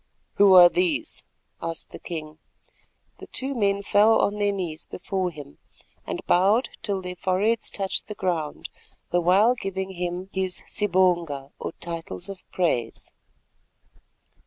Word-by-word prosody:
"Who 200 -2 +7
are 175 -1 +11
these?" 320 - 0 0.4
asked 165 0 -5
the - - -9
king. 155 -2 -7 0.8
The - - -10
two 270 +2 -3
men 200 -4 +1
fell 210 +2 +5
on 205 +1 +1
their 205 0 +2
knees 170 -5 -4
before 185 0 -2
him, 145 -4 -11 0.5
and - - -4
bowed 200 +8 +3
till 200 -4 -2
their 180 0 -5
foreheads 200 +5 +1
touched 195 -2 -2
the 210 - -6
ground—the 175 0 -3
while 195 +7 +5
giving 190 -4 -4
him 180 +1 -4
his 190 -1 -2
sibonga 175 -8 +1
or - - -5
titles 165 - -6
of 195 -2 -8
praise. 125 -11 -1
185 Hz, 135 wpm, -25 LUFS, 170-205 Hz, 0.8 s, are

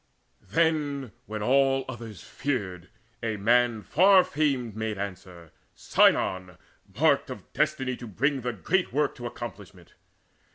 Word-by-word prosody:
Then, 150 -6 0 0.2
when 105 0 -4
all 135 +2 +3
others 115 -7 -8
feared, 100 -11 -4 0.3
a 110 -2 -2
man 115 +1 +2
far 190 +3 +5
famed 135 - -1
Made 110 -1 -3
answer, 90 -4 -8 0.2
Sinon, 90 -2 +2 0.4
marked - - +3
of - - -10
destiny 135 -4 0
To 120 - -9
bring 135 +6 0
the 125 0 -3
great 180 - 0
work 145 +2 +1
to 120 -1 -5
accomplishment. 100 -7 -10
120 Hz, 125 wpm, -27 LUFS, 105-140 Hz, 0.4 s, far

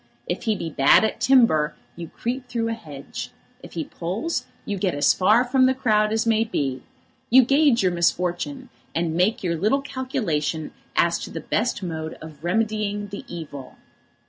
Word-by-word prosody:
If - - -4
he 220 -2 +2
be 165 -4 -5
bad 135 +6 +5
at 220 - -1
timber, 230 - +4 0.2
you 170 -1 -7
creep 250 +8 -4
through 230 -2 -1
a - - -1
hedge. 150 -11 -8 0.3
If - - -12
he 165 - -2
pulls, 230 - -3 0.2
you 200 -2 -3
get 180 -5 0
as 145 - +4
far 215 +6 +4
from 255 +1 +3
the 260 - +2
crowd 215 -5 +2
as 220 +1 +1
may 225 -1 +3
be. 135 - -2 0.5
You 260 +2 +7
gauge 275 -3 +4
your 185 - +3
misfortune, 180 +10 -1 0.3
and 165 -1 0
make 185 +6 +1
your 170 -2 0
little 215 - +1
calculation 170 - -2 0.2
as 170 0 +3
to - - -6
the 165 - -5
best 215 +6 -1
mode 160 -2 -4
of 155 -2 -12
remedying 205 +1 -1
the 200 - -7
evil. 150 -6 -8
205 Hz, 175 wpm, -23 LUFS, 165-240 Hz, 0.5 s, You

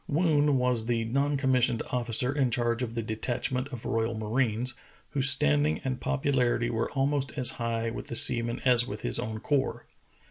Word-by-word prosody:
V/oon 150 -3 +2
was 125 -3 0
the 115 -1 0
non 140 +5 0
commissioned 130 -3 +1
officer 125 +1 0
in 135 -4 +1
charge 120 0 -1
of 120 -2 -4
the 115 - -3
detachment 120 +4 -3
of 125 -5 -9
royal 115 -1 -1
marines, 115 +2 -1 0.4
whose 135 -1 +4
standing 75 - +3
and 130 -1 -4
popularity 125 -4 0
were 115 0 -2
almost 140 0 -1
as 125 -3 +4
high 115 0 -2
with - - -7
the 120 - -5
seamen 120 0 +5
as 125 -1 +3
with 105 +1 -7
his - - +1
own 110 -2 -5
corps. 135 +2 -2
125 Hz, 175 wpm, -27 LUFS, 115-135 Hz, 0.4 s, seamen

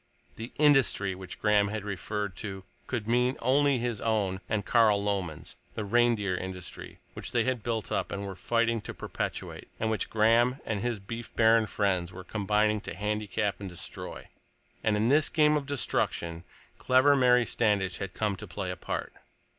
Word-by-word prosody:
The 115 +3 -7
"industry" 135 -10 +4
which 95 -1 -8
Graham 105 -1 +3
had 105 0 -4
referred 100 0 -3
to 95 -3 -6 0.2
could 115 -4 -3
mean 125 +3 +2
only 140 +2 +3
his 120 -3 -2
own 100 -4 0
and 110 -2 -1
Carl 110 -4 +4
Lomen's, 95 -6 -3 0.2
the 110 - -3
reindeer 115 -3 +2
industry 90 0 -7 0.2
which - - -5
they 120 - +3
had 130 -1 -1
built 115 -1 -3
up - - -1
and 100 0 -4
were 95 -1 -6
fighting 115 +3 +1
to - - -7
perpetuate, - - -5
and 110 0 0
which 110 - -2
Graham 115 +4 +3
and 110 -3 -2
his 120 -1 -1
beef 115 +4 -8
baron 110 -1 +5
friends 95 -5 0
were 95 0 -9
combining 105 +1 +1
to - - -7
handicap 105 0 -2
and 100 -2 -6
destroy. 90 - -7 0.6
And 105 -1 +2
in 110 +3 +2
this 145 +2 +4
game 150 -1 +4
of 145 -2 -2
destruction 85 - -1 0.3
clever 130 +3 +5
Mary 125 -2 +5
Standish 105 -6 0
had 100 -1 -5
come 105 -2 0
to 105 - -8
play 95 +1 -4
a - - -4
part! - - -4
105 Hz, 175 wpm, -29 LUFS, 100-120 Hz, 0.6 s, baron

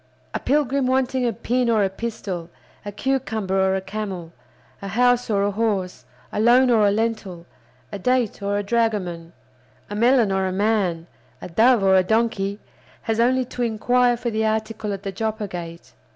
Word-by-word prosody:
A - - -1
pilgrim 275 -1 +1
wanting 260 -1 +1
a - - +1
pin 245 +3 -1
or 220 -3 +3
a 195 - +1
pistol, 190 -5 -5 0.3
a 205 - -6
cucumber 220 -5 -1
or 190 0 +2
a 190 - -1
camel, 190 -4 -6 0.5
a 200 - -6
house 245 +4 +2
or 200 -2 +2
a 205 - +1
horse, 200 -4 -2 0.3
a - - -3
loan 245 +3 +5
or 215 -3 +4
a - - +4
lentil, 205 -5 -2 0.5
a 200 - -5
date 250 -1 0
or 200 0 -1
a 205 - -1
dragoman, 200 -7 -1 0.6
a - - -3
melon 235 -1 +3
or 190 0 0
a - - -2
man, 190 -4 0 0.3
a - - -7
dove 225 +5 +4
or 190 0 +5
a 190 - +6
donkey, 205 -1 0 0.4
has 225 0 -1
only 255 +2 +3
to 245 - -7
inquire 245 +2 +2
for 235 0 -3
the 220 0 -1
article 220 -1 -2
at 195 0 -5
the 195 - -3
Joppa 220 +1 -3
Gate. 170 -2 -8
215 Hz, 180 wpm, -22 LUFS, 195-240 Hz, 0.6 s, a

